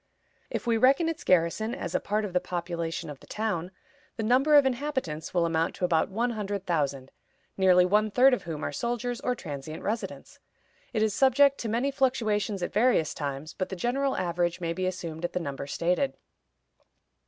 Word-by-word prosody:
If - - -4
we 230 -1 +2
reckon 270 +8 +4
its 330 0 -3
garrison 185 +7 +2
as - - -5
a - - +2
part 210 +1 -1
of 190 - -6
the 180 - +3
population 170 -2 -4
of 145 -2 -8
the - - -17
town, 205 -6 -2 0.5
the 225 - -3
number 265 +7 +4
of 285 -2 +7
inhabitants 255 - -2
will 175 -2 +2
amount 165 0 0
to 180 - 0
about 165 -2 +2
one 235 +5 0
hundred 205 -3 -4
thousand, 140 -6 -1 0.4
nearly 180 -2 +5
one 210 +3 +3
third 255 +5 +5
of 250 - 0
whom 160 -3 -6
are - - -2
soldiers 240 +1 -3
or 250 -2 0
transient 150 - -7
residents. 220 +3 -4 0.5
It 220 -3 +1
is 215 -2 +1
subject 275 +3 +4
to 230 - -3
many 240 +6 0
fluctuations 220 -8 0
at - - -3
various 215 -8 +3
times, 145 +1 -5
but 185 -1 -3
the 190 - -4
general 265 +8 0
average 175 -1 -1
may 170 -1 -2
be 185 +1 -2
assumed 170 -3 -5
at 175 - -2
the - - 0
number 140 -4 -5
stated. 180 - 0
195 Hz, 190 wpm, -28 LUFS, 170-245 Hz, 0.5 s, of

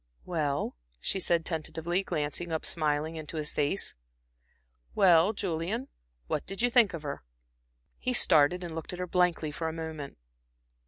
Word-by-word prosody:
"Well," 150 - -1 0.2
she 190 - -2
said 170 -2 +1
tentatively, 165 +2 -2
glancing 155 0 -2
up 160 - -2
smiling 155 0 0
into 155 +1 -6
his 150 -1 -1
face, 150 +7 0 1.0
"well, 180 0 +6
Julian, 195 +5 -2 0.4
what - - -2
did 195 - -5
you 245 - +3
think 235 -7 +5
of 160 - -7
her?" 140 -1 -4 0.8
He 255 - -1
started 165 -4 +5
and 170 -2 -5
looked 160 +2 -5
at - - -5
her 180 - -1
blankly 175 -3 +1
for 160 +2 -3
a 160 - -3
moment. 160 -3 -6
165 Hz, 155 wpm, -29 LUFS, 155-180 Hz, 1.0 s, well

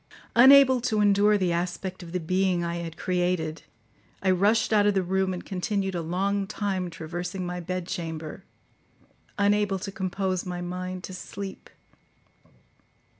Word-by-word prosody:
Unable 260 +1 +8
to 215 -2 0
endure 205 0 +4
the 185 -3 0
aspect 180 +2 -3
of 170 -1 -9
the 180 - -1
being 185 +1 +1
I 170 0 -2
had 165 -1 -6
created, 175 -3 -1 0.6
I 190 - +4
rushed 210 +5 +2
out 205 -1 +4
of 205 - +2
the 190 - +2
room 190 +1 0
and 180 -1 -6
continued 195 0 -2
a 175 - -2
long 195 +4 -1
time 195 -3 -2
traversing 175 +3 -5
my 180 0 -4
bed 180 +1 -4
chamber, 165 0 -5 0.9
unable 205 -1 +2
to 195 +2 -6
compose 190 -1 -2
my 180 -1 -5
mind 180 +1 -5
to 185 - -7
sleep. 195 +1 -8
185 Hz, 150 wpm, -26 LUFS, 175-200 Hz, 0.9 s, Unable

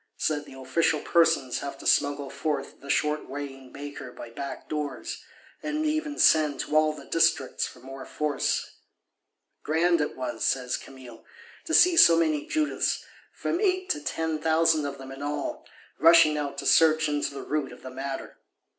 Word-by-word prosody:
So 155 - 0
that 145 - -8
the 135 - -12
official 155 +4 +1
persons 165 -7 +2
have 140 - -6
to - - -12
smuggle 145 -1 +1
forth 155 -2 -3
the 140 - -12
short 150 0 0
weighing 135 -2 -7
Baker 145 -3 -8
by 120 -1 -10
back 140 +4 -7
doors, 150 -1 -4 0.4
and 305 +1 -2
even 305 -1 -1
send 155 -2 +4
"to 150 - -4
all 155 0 +4
the - - -11
Districts" 165 -5 +1
for - - -14
more 135 0 -9
force. 150 -2 -2 0.8
Grand 165 +2 +2
it 150 - -3
was, 130 - -4
says 125 -2 0
Camille, 130 -4 -11 0.4
to 325 - 0
see 360 -1 +6
so 170 - +8
many 155 -3 0
Judiths, 310 -1 0 0.3
from 340 - -3
eight 370 -2 +1
to 150 - -2
ten 160 +1 -2
thousand 160 -1 +2
of 140 0 -6
them 135 0 -10
in 135 +1 -9
all, 145 +1 -4 0.3
rushing 165 -2 +6
out 140 -2 -3
to - - -5
search 160 -1 +5
into 145 -1 -2
the 135 - -6
root 150 -3 -2
of - - -14
the 130 - -8
matter! 135 +1 -6
150 Hz, 175 wpm, -26 LUFS, 140-165 Hz, 0.8 s, so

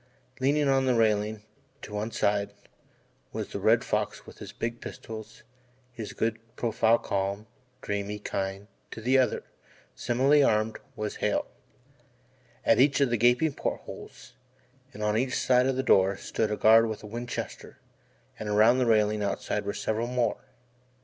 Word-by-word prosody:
Leaning 145 +2 +2
on 135 -1 +3
the 125 - +3
railing, 105 -1 +1 0.4
to 105 - -9
one 105 +2 -2
side, 100 -2 0 0.8
was - - -4
the - - -5
Red - - +3
Fox - - -2
with - - -14
his - - -8
big 115 +1 -4
pistols, 110 -1 -9 0.5
his 115 -4 -7
good 115 0 -1 0.2
profile 115 -1 +2
calm, 100 +1 -2 0.4
dreamy, 100 0 -3
kind 95 0 -4 0.2
to - - -8
the 130 +4 +3
other, 130 - +1 0.5
similarly 135 +5 +3
armed, 110 -3 +1 0.2
was 105 -1 -4
Hale. - - 0 1.2
At - - +4
each 140 +2 +4
of 140 -4 +2
the - - +3
gaping 120 +6 +3
port - - -3
holes, - - -11 0.6
and 105 -6 -7
on 105 0 +1
each 130 +1 -1
side 125 0 +3
of 135 - 0
the 130 - -1
door, 95 -5 +4
stood 110 +2 -2
a 105 - -2
guard 115 +1 +6
with 110 -1 -6
a - - -8
Winchester, 120 +3 -6 0.6
and 110 - -4
around 110 +5 +5
the 125 - +2
railing 105 -1 +3
outside 100 +1 -2
were 100 - -1
several 110 +2 -1
more. 125 -1 -1
110 Hz, 160 wpm, -28 LUFS, 105-125 Hz, 1.2 s, guard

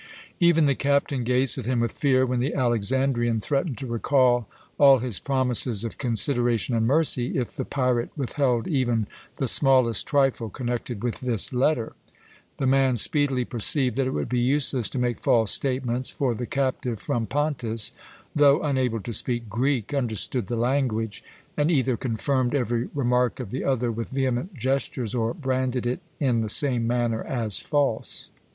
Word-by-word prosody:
Even 170 -2 +4
the 140 - +3
captain 140 -1 0
gazed 125 +2 +1
at 120 - -6
him 125 -1 +1
with 115 0 0
fear, 130 -2 +2
when 125 -1 -1
the 130 +4 -1
Alexandrian 120 -1 +1
threatened 140 - -1
to 130 - -6
recall 120 -1 +2 0.3
all 140 -2 +7
his 120 -4 -2
promises 125 -5 +1
of 115 - -5
consideration 120 0 +1
and 115 0 +1
mercy 135 -3 +1
if 125 -3 -2
the - - -3
pirate 125 -3 0
withheld 130 -3 0
even 120 -7 0 0.3
the 135 - -2
smallest 130 -4 +4
trifle 135 -5 +1
connected 120 -3 -4
with 120 -2 -2
this 125 -2 -1
letter. 125 -2 0 0.6
The 135 - -2
man 130 -1 +3
speedily 135 +1 +2
perceived 125 +3 +1
that 135 -1 +1
it 130 - -2
would - - -2
be 125 - -1
useless 130 -3 +1
to - - -5
make 120 -1 -1
false 110 -3 +2
statements; 130 -2 0
for 130 -4 -1
the 120 +2 -5
captive 130 -4 -2
from 120 -3 -2
Pontus, 125 -6 -2 0.4
though 145 -1 +4
unable 130 -6 0
to 115 - -6
speak 120 -1 -1
Greek, 125 +2 -1
understood 120 -3 -1
the 120 - -2
language, 115 -4 -1 0.3
and 150 +2 +1
either 130 -6 +2
confirmed 125 +3 -1
every 120 -3 -1
remark 125 -4 +1
of 95 - -6
the 130 - -3
other 125 -3 0
with 115 +1 -5
vehement 130 +6 -2
gestures, 130 -2 -2
or 115 -1 -1
branded 130 -3 -1
it 125 +5 -1 0.2
in 125 -5 +1
the 110 - -3
same 125 -1 +1
manner 120 -2 0
as 110 -8 -1
false. 145 -7 -2
125 Hz, 165 wpm, -25 LUFS, 115-135 Hz, 0.6 s, all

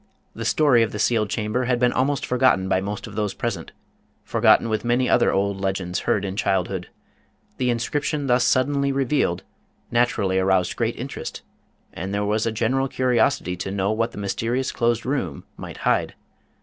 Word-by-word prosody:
The - - -6
story 145 -6 +4
of 115 - 0
the - - -3
sealed 110 -1 +1
chamber 110 +4 -1
had 125 0 +1
been 125 0 +2
almost 135 +2 0
forgot 125 +1 +3
ten 95 0 -4
by 95 - +1
most 100 +2 -4
of 110 - -10
those 105 -1 -2
present, - - -4 0.5
forgotten - - +3
with 110 -1 -1
many 120 +1 +1
other - - +3
old 100 0 0
legends 95 -2 -2
heard 100 -1 +2
in 95 0 -4
childhood. 95 -3 -1 0.7
The 125 -1 0
inscription 145 +5 -1
thus 125 -1 +3
sud 130 +1 +3
denly 140 -1 0
revealed 135 -9 0 0.5
naturally 115 -6 +1
aroused 95 -1 +1
great - - -1
interest, - - -6 0.5
and 95 - -5
there 105 0 0
was 105 +2 0
a - - 0
general 120 +5 0
curiosity 125 -7 +1
to 95 - -4
know 100 +1 0
what 115 +2 0
the - - -12
mysterious 115 +6 -1
closed 120 0 0
room 125 - -2
might - - -9
hide. - - +1
115 Hz, 180 wpm, -23 LUFS, 100-125 Hz, 0.7 s, story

